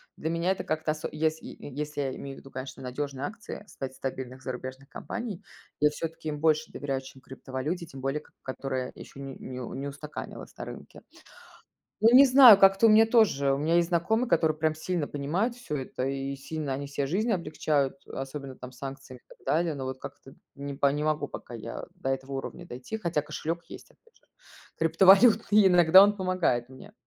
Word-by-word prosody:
Для 160 - -3
меня 170 +2 0
это 190 - -2
как-то 155 0 -1
осо 155 0 -4
если 155 +1 -1
е - - -10 0.2
если 150 0 -3
я 135 -2 -2
имею 135 -1 -8
в - - -10
виду, 135 - -15
конечно, 130 +1 -7
надёжные 135 +1 -4
акции, 215 +1 -7
стать 135 -8 -7
стабильных 130 -1 -6
зарубежных 130 +1 -7
компаний, 215 - -6 0.4
я 150 - +6
всё-таки 160 +1 -5
им 150 -1 -4
больше 155 0 +2
доверяю, 135 -2 -3
чем 135 0 -13
криптовалюте, 135 +7 -5
тем 145 -5 -11
более, 135 +3 -1
к - - -23
которая 130 -1 -4
ещё - - -12
не 135 -1 -7
не 130 0 -7 0.2
не 140 - -4
устаканилась 145 +2 -8
на - - -6
рынке. - - -10 1.0
Ну, 230 +2 +6
не 275 - +10
знаю, 255 -4 +10
как-то 195 +2 +6
у - - +7
меня 220 +1 +7
тоже, 205 - +3
у 135 - 0
меня 155 +3 +1
есть 170 -1 +3
знакомые, 220 +8 +1
которые 160 -4 +2
прям 155 0 +1
сильно 155 0 -2
понимают 165 - -1
всё 240 -11 -5
это, 130 -1 -4
и 135 0 -3
сильно 145 +1 -4
они 140 +2 -4
себе 140 0 -2
жизнь 205 - 0
облегчают, 155 -6 0
особенно 135 0 -6
там 125 0 -10
с 125 - -17
санкциями, 135 -2 -8
и - - -46
так - - -33 0.2
далее. 165 0 +1
Но 135 -2 -5
вот 130 0 -5
как-то 135 - -10 0.2
не 140 0 -6
п 140 0 +3
не 150 +1 -2
могу 155 -1 0
пока - - -9
я - - -6
до - - -4
этого 135 +1 -3
уровня 135 +6 -6
дойти, 130 - -6
хотя 170 -6 0
кошелек 160 +3 -4
есть, - - -11
опять 465 -1 -28
же, - - -28 0.6
криптовалютный, 200 +5 +6
иногда 180 +1 +8
он 205 +1 +4
помогает 185 - 0
мне. 165 +11 -13
150 Hz, 200 wpm, -28 LUFS, 135-175 Hz, 1.0 s, не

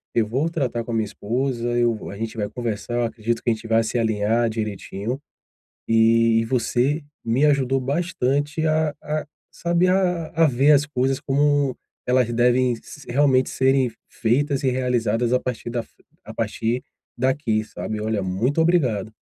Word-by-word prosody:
eu 115 - +3
vou 135 +9 0
tratar 130 -7 -2
com 120 - -5
a - - -2
minha 110 -1 +1
esposa, 120 +3 -2
eu 120 -1 +3
vou 110 - -8
a - - -7
gente 110 +1 -5
vai 105 -1 -2
conversar, 120 -1 -4
eu 120 - +1
acredito 115 0 -3
que - - +1
a - - +4
gente 110 +1 -8
vai 115 0 +3
se 110 +2 -2
alinhar 110 +1 +1
direitinho, 110 +3 -4 0.7
e 115 0 +4
você 130 +5 0 0.2
me 120 +5 +2
ajudou 135 -2 +2
bastante 145 +1 -1
a 155 -1 +1
a 150 +1 -3 0.2
saber 175 +1 +1
a 180 -3 +1
a 165 -1 +5
ver 140 +2 +4
as 145 0 +4
coisas 135 -2 0
como 145 -1 +1 0.3
elas 125 -1 +2
devem 125 +1 +3
s 135 +5 -12
realmente 130 0 +3
serem 130 -1 +2 0.2
feitas 130 +4 0
e 130 - +3
realizadas 125 -2 0
a 125 - +3
partir 120 -1 -4
da 120 0 -1
f - - -22 0.3
a - - -9
partir 115 +3 -1 0.4
daqui, 130 -4 +1
sabe. 110 0 -5
Olha, 110 -1 -1
muito 110 - 0
obrigado. 125 - +1
125 Hz, 170 wpm, -23 LUFS, 115-140 Hz, 0.7 s, a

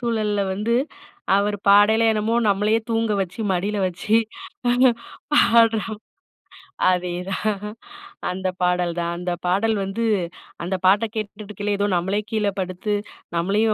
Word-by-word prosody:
சூழல்ல 215 -4 0
வந்து 220 +4 0 0.6
அவர் 205 +1 +1
பாடயிலே 210 +3 +6
என்னமோ 215 +1 0
நம்மளையே 210 +2 +2
தூங்க 225 -1 +1
வச்சு, 185 +3 -4
மடியில 200 +3 -1
வச்சு, 185 +5 0 0.5
பானா 245 +1 +5 0.4
பாடுற 230 -5 +5 1.1
அதேதான் 185 +3 -2 0.7
அந்த 185 +1 -3
பாடல் 180 -1 +1
தான். 170 0 -1
அந்த 180 0 -3
பாடல் 200 +5 +2
வந்து 195 +4 -3 0.6
அந்த 185 +2 -2
பாட்ட 205 +4 +5
கேட்டுட்டுக்கையிலே, 210 -1 -4
ஏதோ 205 - +2
நம்மளே 190 +4 0
கீழ 215 -2 +1
படுத்து 185 +3 -3 0.4
நம்மளையும் 205 +6 +2
205 Hz, 120 wpm, -22 LUFS, 185-220 Hz, 1.1 s, பாடயிலே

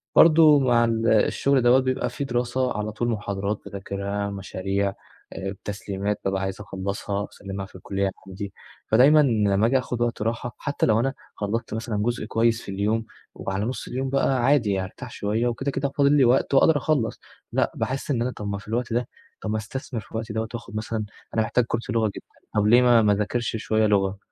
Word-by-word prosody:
برضه 155 -3 +7
مع 120 -3 +4
ال 115 0 0
الشغل 130 +5 +3
دوّة 120 +2 +6
بيبقى 130 0 -1
في - - -4
دراسة، 125 -1 -1
على 105 0 -2
طول 115 +2 -2
محاضرات 100 -1 -2
باذاكرها، 100 +1 -4
مشاريع، 100 0 -2 0.4
آآ 95 - -5
التسليمات 100 0 -4
بابقى 95 0 0
عايز 95 +1 -3
أخلّصها 100 0 -3
وأسلّمها 100 -1 -6
في - - -18
الكلية 95 +1 -2 0.2
عندي. 95 +1 -6 0.3
فدايمًا 135 +7 +6
لمّا 110 -6 +3
آجي 130 +3 +3
آخد 125 -2 -3
وقت 120 -2 0
راحة 120 +1 -2
حتى 145 -1 -1
لو 110 0 +3
أنا 135 +3 0 0.2
خلّصت 110 +3 -3
مثلًا 110 -1 -3
جزء 120 -1 -1
كويس 115 +1 +1
في 100 - -7
اليوم 105 +3 0 0.3
وعلى 95 +2 -3
نص 125 - -4
اليوم 130 +1 -2
بقى 135 -2 +1
عادي 130 -6 +3
يعني، 95 -1 0
أرتاح 125 +5 -10
شوية، 110 +3 -1
وكده، 135 +4 -1
كده 135 +1 -1
فاضل 140 -1 +4
لي 135 - +6
وقت، 125 +3 +3
وأقدر 145 +3 +5
أخلّص 140 -5 0 0.3
لأ - - +1
باحس 135 +3 -2
إن 120 -4 0
أنا 125 +1 0
طَب 105 - -7
ما 100 0 -2
في 100 - -12
الوقت 115 +1 -2
ده، 120 +1 0 0.3
طَب 110 - -4
ما 110 - 0
أستثمر 115 +2 -5
في 105 - -19
الوقت 110 0 -4
دوّة 110 0 -2
وآخد 120 -2 -7
مثلًا 110 0 -2 0.3
أنا 110 - +2
محتاج 115 +2 +1
كورس 115 0 -3
لغة 115 0 +2
جدًا، - - -9 0.3
طَب 105 0 +3
ليه 120 +3 +7
ما 120 -2 +6
ما 105 -1 +4
اذاكرش 105 +4 -1
شوية 110 0 +1
لغة، 100 -1 +1
110 Hz, 200 wpm, -24 LUFS, 100-125 Hz, 0.4 s, برضه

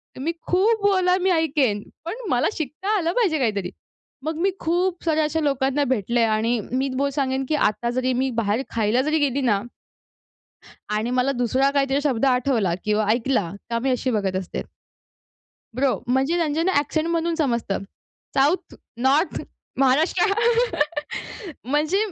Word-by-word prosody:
तुम्ही 310 +6 -2
खूप 415 +4 +2
बोला 370 -2 +3
मी 380 - +2
ऐकेन. 285 -10 +1 0.2
पण 340 - -3
मला 245 0 +2
शिकता 320 +8 -2
आलं 335 -3 0
पाहिजे 370 - +2
काहीतरी. 200 -7 -1 0.5
मग 315 0 -1
मी 385 +1 +3
खूप 350 +2 0
साऱ्या 315 -2 +2
अशा 310 +2 0
लोकांना 275 -1 +1
भेटलंय. 235 +2 +1
आणि 225 +2 +1
मी 265 +2 0
बोल-सांगेन, 270 -1 0
की 305 - +2
आता 235 -2 +1
जरी 255 0 +1
मी 265 - +1
बाहेर 215 +4 0
खायला 225 +2 +2
जरी 305 +3 +1
गेली 280 -1 +1
ना, 210 -6 +2 1.4
आणि 220 +3 -1
मला 255 +2 +2
दुसरा 265 +3 +2
काहीतरी 275 0 +1
शब्द 270 -4 +1
आठवला 250 -8 +2
किंवा 210 0 +1
ऐकला 230 -7 0 0.2
का 230 0 0
मी 265 +2 -1
अशी 255 0 0
बघत 195 -4 -1
असते. 185 - -5 1.2
ब्रो, 270 0 +1
म्हणजे 270 +7 +2
त्यांच्या 320 -1 0
ना 380 - +2
एक्सेंटमधून 330 +2 -1
समजतं. 235 - 0 0.6
साउथ, 290 +7 +1 0.2
नॉर्थ, 275 +8 +2 0.4
महाराष्ट्र 310 +9 +3 1.4
म्हणजे 300 +8 +1
270 Hz, 145 wpm, -23 LUFS, 240-320 Hz, 1.4 s, बोला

